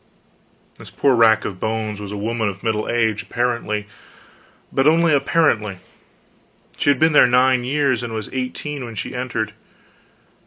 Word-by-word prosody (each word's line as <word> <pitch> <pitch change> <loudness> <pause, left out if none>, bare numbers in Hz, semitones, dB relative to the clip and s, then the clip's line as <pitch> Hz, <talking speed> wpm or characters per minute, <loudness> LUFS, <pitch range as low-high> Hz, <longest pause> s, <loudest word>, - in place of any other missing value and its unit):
This - - -11
poor 135 -2 +2
rack 110 -2 +4
of 95 -3 -5
bones 110 -1 -3
was 100 -1 -7
a 105 - -5
woman 110 +1 -1
of 100 0 -9
middle 110 -2 -1
age, 110 -3 +1
apparently; 115 -4 -2 0.9
but 135 +2 +2
only 165 0 +4
apparently; 125 - +1 1.0
she - - 0
had 140 - +4
been 160 0 +3
there 145 - +7
nine 125 0 +3
years, 135 -2 0
and 120 -1 -5
was 110 -2 -5
eighteen 130 +2 -4
when 115 -2 -8
she 95 - -5
entered. 120 -4 -3
120 Hz, 155 wpm, -20 LUFS, 110-130 Hz, 1.0 s, there